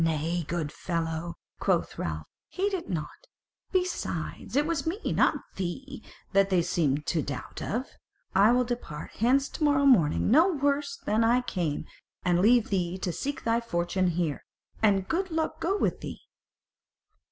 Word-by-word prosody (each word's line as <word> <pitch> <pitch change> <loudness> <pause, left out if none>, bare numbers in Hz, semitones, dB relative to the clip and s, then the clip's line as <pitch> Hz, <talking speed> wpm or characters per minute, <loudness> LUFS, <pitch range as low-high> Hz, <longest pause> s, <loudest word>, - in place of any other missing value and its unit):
"Nay, 165 +2 0
good 165 -4 -2
fellow," 165 0 -3 0.2
quoth - - 0
Ralph, 75 -2 -3 0.2
"heed 395 +2 -1
it 350 -3 -3
not: 165 - -5 0.4
besides, 365 -7 -2
it 290 +1 +3
was 320 -3 -1
me, 340 +5 0 0.2
not - - +4 0.2
thee, 245 +9 -4 0.3
that 195 0 +4
they 180 -3 +3
seemed 150 -4 0
to 165 - +1
doubt 145 - -6
of. 240 +5 -2 0.5
I 200 +4 +6
will 250 +1 +4
depart 235 -11 -5
hence 265 +5 +3
to - - -4
morrow 285 -1 +4
morning 200 - +4
no 325 +9 +6
worser 285 +3 -1
than 215 +2 +2
I 240 +2 +4
came, 170 -11 -2 0.4
and 175 -1 +3
leave 230 +2 +4
thee 180 -2 0
to 185 -1 -2
seek 285 - -4
thy 230 +1 +2
fortune 185 -3 0
here; 170 -4 -1 0.4
and 195 -3 +3
good 370 +3 0
luck 320 -1 -1
go 390 +4 0
with - - 0
thee." - - -7
210 Hz, 160 wpm, -28 LUFS, 170-280 Hz, 0.5 s, I